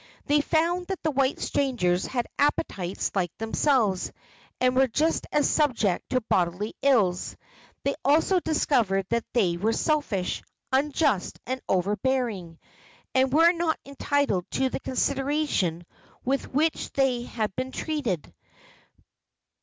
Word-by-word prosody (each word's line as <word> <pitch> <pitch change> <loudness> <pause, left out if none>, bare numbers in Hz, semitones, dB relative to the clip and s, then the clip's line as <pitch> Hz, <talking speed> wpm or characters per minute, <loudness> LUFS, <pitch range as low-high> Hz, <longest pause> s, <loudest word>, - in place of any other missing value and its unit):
They 295 +1 +3
found 340 +4 0
that 385 -2 -4
the 310 - +1
white 275 -1 +1
strangers 190 -11 0
had 245 -2 -1
appetites 200 - 0
like 180 -4 0
themselves, 225 -3 +1 0.5
and 255 0 +2
were 265 +1 +4
just 310 +7 0
as 295 - +3
subject 240 - +1
to 255 - +1
bodily 185 0 0
ills. 210 -10 +2 0.5
They 280 - +1
also 320 +6 +3
discovered 235 - +1
that 235 0 -1
they 185 -8 +2
were 220 +5 +1
selfish, 235 - 0 0.3
unjust 275 - +1
and 260 +1 -3
overbearing, 205 -2 0 0.6
and 260 0 +3
were 330 +4 +6
not 335 -2 -1
entitled 280 -8 0
to 265 0 +1
the - - -4
consideration 265 - 0 0.4
with 270 +2 -1
which 310 +4 0
they 265 -3 +2
had 220 -4 -3
been 260 +1 -3
treated. 260 - -3
260 Hz, 125 wpm, -26 LUFS, 200-290 Hz, 0.6 s, were